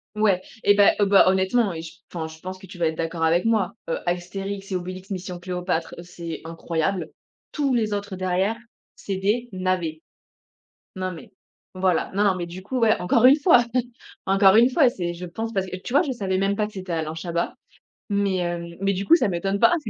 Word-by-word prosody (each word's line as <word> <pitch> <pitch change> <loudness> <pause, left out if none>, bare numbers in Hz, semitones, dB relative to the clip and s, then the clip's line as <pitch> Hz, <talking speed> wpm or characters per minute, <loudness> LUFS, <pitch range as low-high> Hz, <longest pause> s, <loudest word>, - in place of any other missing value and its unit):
Ouais, 205 -4 +2 0.2
eh 205 - +7
ben, 205 0 +6
heu, 205 - +4
bah 195 -1 +6
honnêtement 190 +3 +2
et 160 -1 -5
je 165 - -9 0.2
enfin 160 -2 -3
je 160 0 -11
pense 185 0 -6
que 190 0 -13
tu 180 - -11
vas 170 -2 +1
être 160 - -3
d'accord 165 0 -2
avec 170 +5 +3
moi, 215 -5 +1
heu, - - 0
Astérix 195 +3 -4
et - - 0
Obélix: 185 +2 -6
Mission 180 -2 -5
Cléopâtre, 180 -2 -3
c'est 170 -2 -7
incroyable. 165 +1 -2 0.4
Tous 280 -4 0
les 215 -3 +1
autres 200 -2 -4
derrière, 185 +4 0 0.4
c'est 195 - -4
des 210 +6 0
navets. 180 -4 -1 0.9
Non, 185 0 -3
mais 170 - -11 0.4
voilà, 185 -2 +1
non, 205 - +3
non 200 - +4
mais 175 -1 -4
du 180 +2 -9
coup, 255 +5 -3
ouais 225 -1 +3
encore 225 +7 +3
une 265 +3 +9
fois, 285 -6 +6 0.6
encore 195 0 +5
une 240 +3 +6
fois 270 -2 +5
c'est 175 -7 -4
je 180 +1 -7
pense 225 +6 -5
parce 190 -2 -1
que, 185 - -5
tu 240 +7 -8
vois? 285 - +6
Je 295 - -2
savais 190 -4 -1
même 195 +1 +1
pas 210 0 0
que 210 - -9
c'était 185 -3 -5
Alain 160 -1 -2
Chabat, 170 +1 -2 0.6
mais 200 -2 +1
hem, 170 -1 -3
mais 195 0 +1
du 195 +2 -3
coup 335 - +7
ça 250 - +1
m'étonne 195 +2 -1
pas. 350 - +5
190 Hz, 215 wpm, -24 LUFS, 175-205 Hz, 0.9 s, une